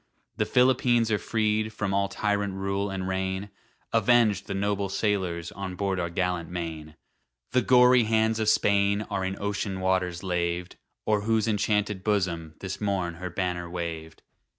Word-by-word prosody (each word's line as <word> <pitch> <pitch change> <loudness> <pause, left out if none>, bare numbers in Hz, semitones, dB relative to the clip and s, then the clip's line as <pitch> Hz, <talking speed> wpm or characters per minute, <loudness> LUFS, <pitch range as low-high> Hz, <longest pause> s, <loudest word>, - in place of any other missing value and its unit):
The - - 0
Philippines 125 -2 +3
are 105 - +2
freed 110 0 0
from 100 -3 -2
All 100 0 +2
tyrant 100 0 -1
rule 100 +1 -2
and 95 -1 -3
reign, 95 +1 -2 0.4
Avenged 110 -6 +3
the 100 - -3
noble 100 0 -1
sailors 95 -5 -1
On 95 -1 -6
board 95 -1 -1
our 85 -1 -1
gallant 90 -1 -1
Maine! 80 -3 -6 0.6
The 125 - +3
gory 125 -1 +5
hands 110 0 +2
of 110 -1 +2
Spain 100 0 +3
are 100 -2 -1
In 95 +1 -3
ocean 100 -1 -2
waters 90 -2 0
laved, 85 -1 -2 0.3
O'er 105 -1 +2
whose 110 0 +1
enchanted 105 -2 0
bosom 85 -7 -1
This 95 +1 -5
morn 95 -4 -1
her 90 - -3
banner 90 -1 -3
waved. 85 -2 -6
100 Hz, 155 wpm, -27 LUFS, 90-105 Hz, 0.6 s, gory